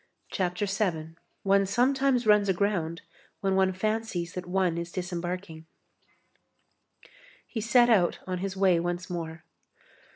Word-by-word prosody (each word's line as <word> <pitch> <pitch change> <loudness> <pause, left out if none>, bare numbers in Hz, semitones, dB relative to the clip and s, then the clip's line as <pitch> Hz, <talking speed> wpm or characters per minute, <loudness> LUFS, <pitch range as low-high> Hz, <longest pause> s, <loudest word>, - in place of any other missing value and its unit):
CHAPTER 180 +1 -1
VII—ONE 195 0 -1
SOMETIMES 255 +3 +2
RUNS 210 -2 +4
AGROUND 175 -4 0 0.4
WHEN 195 -1 +1
ONE 190 0 +3
FANCIES 205 -3 -2
THAT 180 -1 -6
ONE 180 -2 +1
IS 170 0 -5
DISEMBARKING 175 -2 -5 1.8
He 225 - -5
set 240 +2 +5
out 185 -6 +3
on 185 -1 -3
his 195 0 -4
way 190 -3 +4
once 175 +2 -3
more. 165 -2 -5
185 Hz, 120 wpm, -28 LUFS, 175-205 Hz, 1.8 s, set